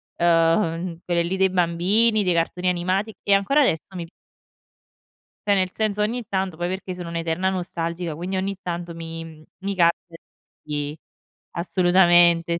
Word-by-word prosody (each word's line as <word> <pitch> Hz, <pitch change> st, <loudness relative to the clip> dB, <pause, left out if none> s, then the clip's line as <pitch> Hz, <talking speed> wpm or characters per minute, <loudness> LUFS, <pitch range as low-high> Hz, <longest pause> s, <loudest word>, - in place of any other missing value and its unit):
eh 170 Hz, -, 0 dB
ehm, 165 Hz, 0 st, +2 dB
quelle 170 Hz, -1 st, +1 dB
lì 180 Hz, +3 st, -2 dB
dei 190 Hz, 0 st, +3 dB
bambini, 190 Hz, +6 st, +2 dB
dei 180 Hz, -2 st, +2 dB
cartoni 180 Hz, +2 st, 0 dB
animati 185 Hz, +5 st, -1 dB
e 200 Hz, -, +3 dB
ancora 200 Hz, +10 st, +3 dB
adesso 165 Hz, -, +2 dB
mi 170 Hz, -, -4 dB
p 165 Hz, -, -19 dB, 1.4 s
Cioè 205 Hz, -, +3 dB
nel 185 Hz, -1 st, +1 dB
senso 210 Hz, -1 st, -1 dB
ogni 235 Hz, +4 st, -1 dB
tanto 190 Hz, -3 st, -2 dB
poi 175 Hz, +1 st, -2 dB
perché 190 Hz, 0 st, -4 dB
sono 180 Hz, -2 st, -7 dB
un'eterna 170 Hz, +2 st, -1 dB
nostalgica, 170 Hz, -2 st, -3 dB
quindi 180 Hz, +4 st, -4 dB
ogni 195 Hz, +1 st, -2 dB
tanto 175 Hz, -2 st, -5 dB
mi, 165 Hz, 0 st, -7 dB
mh, 155 Hz, -1 st, -13 dB, 0.2 s
mi 195 Hz, +1 st, -3 dB
capita 170 Hz, -1 st, +1 dB, 0.5 s
di 150 Hz, 0 st, -4 dB, 0.6 s
assolutamente 175 Hz, -1 st, +4 dB
175 Hz, 155 wpm, -23 LUFS, 170-190 Hz, 1.4 s, assolutamente